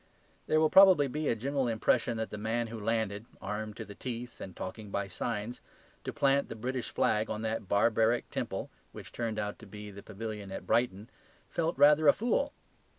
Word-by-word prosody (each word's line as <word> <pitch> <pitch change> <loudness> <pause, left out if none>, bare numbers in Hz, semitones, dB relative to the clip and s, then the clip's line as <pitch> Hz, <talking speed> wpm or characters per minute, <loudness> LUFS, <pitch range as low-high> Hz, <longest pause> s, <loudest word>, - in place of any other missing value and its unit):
There 155 - +4
will 155 -1 +3
probably 190 -7 +8
be 150 +3 -2
a - - +2
general 135 +3 -1
impression 115 +1 +1
that 110 0 -3
the 105 - -5
man 115 +2 0
who 115 0 -6
landed 110 0 -1
(armed 105 +1 -4
to 110 - -5
the 105 - -10
teeth 120 +2 -6
and 95 -2 -7
talking 105 +3 -6
by 100 0 -2
signs) 105 +5 -4 0.4
to - - -2
plant 140 0 +2
the - - -5
British 125 +2 -3
flag 110 +1 +1
on 110 0 -3
that 110 -2 -2
barbaric 115 +3 +3
temple - - -3 0.2
which - - -10
turned 115 -2 -3
out 105 0 -3
to 115 - -12
be 105 +1 -9
the 100 0 -10
Pavilion 105 -1 -6
at - - -6
Brighton, 115 -1 0 0.4
felt 165 -2 -1
rather 150 +2 +6
a - - +9
fool. 245 +6 0
115 Hz, 195 wpm, -31 LUFS, 105-130 Hz, 0.4 s, a